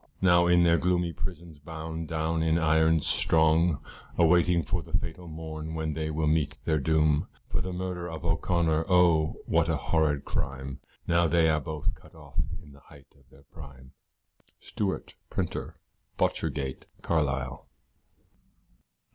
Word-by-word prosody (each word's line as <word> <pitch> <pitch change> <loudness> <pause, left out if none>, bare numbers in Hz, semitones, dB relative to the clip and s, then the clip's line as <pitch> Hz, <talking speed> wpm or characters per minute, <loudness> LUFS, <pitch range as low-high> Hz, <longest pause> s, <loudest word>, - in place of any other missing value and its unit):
Now 85 -2 +5
in 85 0 +5
their 85 0 +4
gloomy 90 -1 +1
prisons 85 -5 -7
bound 80 +1 -6
down 80 +1 -1
in 80 0 +2
irons 80 -1 +3
strong, 80 -1 +3 0.3
Awaiting 85 0 +4
for 90 -3 -2
the - - -1
fatal 90 -1 -7
morn 80 0 -6
when 80 -1 -2
they 80 0 -3
will 80 0 -1
meet 75 -1 +1
their 80 -2 +2
doom, 75 0 +2 0.2
For - - -2
the 95 - -4
murder 90 -1 -4
of 80 0 -7
O'Connor 80 -1 +1
oh! 85 -4 +3
what 85 0 +2
a 80 - +1
horrid 75 -1 0
crime, 70 0 -4 0.3
Now 85 0 +3
they 80 0 +3
are 75 -1 +2
both 75 -1 -3
cut - - -17
off - - -8 0.2
in 75 - -15
the 70 - -16
height 70 -1 -18
of 70 -2 -26
their 70 +1 -19
prime. 65 -1 -13 0.7
Stewart, 100 -2 -3 0.2
Printer, - - -3 0.4
Botchergate, 65 -3 -1 0.2
Carlisle. 70 -4 -1
80 Hz, 145 wpm, -28 LUFS, 75-85 Hz, 0.7 s, Now